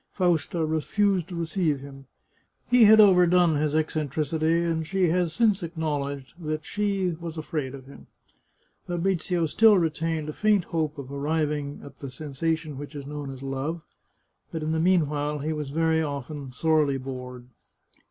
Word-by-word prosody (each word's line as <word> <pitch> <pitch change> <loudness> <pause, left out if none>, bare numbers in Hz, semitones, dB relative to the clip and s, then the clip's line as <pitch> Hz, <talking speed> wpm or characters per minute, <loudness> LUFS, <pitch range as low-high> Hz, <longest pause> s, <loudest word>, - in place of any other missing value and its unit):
Fausta 175 -2 +1
refused 180 +4 +1
to 180 - -7
receive 165 -3 0
him. 135 -1 -12 0.6
He 245 -2 +6
had 220 +1 +8
overdone 180 -5 +5
his 150 0 0
eccentricity, 155 +2 0
and 165 -2 -1
she 190 -2 +1
has 175 0 +1
since 215 0 +2
acknowledged 145 -5 -3
that 155 0 -3
she 195 -4 -1
was 165 -1 -6
afraid 150 -4 -3
of 130 -1 -11
him. 140 - -14 0.8
Fabrizio 175 -1 0
still 215 +6 +5
retained 160 -2 -1
a 155 - -4
faint 210 -1 +2
hope 155 -3 -2
of 140 -1 -8
arriving 145 0 -2
at 140 -1 -12
the 140 - -6
sensation 155 +2 -3
which 145 +1 -8
is 140 -1 -6
known 145 -1 -6
as 135 0 -8
love, 135 +5 -3 0.7
but 160 -1 -4
in 155 - -1
the 160 - 0
mean 175 -2 +3
while, 150 0 -2
he 150 +2 -2
was 150 -2 -4
very 160 +2 +1
often 140 -1 -5
sorely 150 +1 +2
bored. 125 -1 -7
155 Hz, 160 wpm, -26 LUFS, 145-170 Hz, 0.8 s, had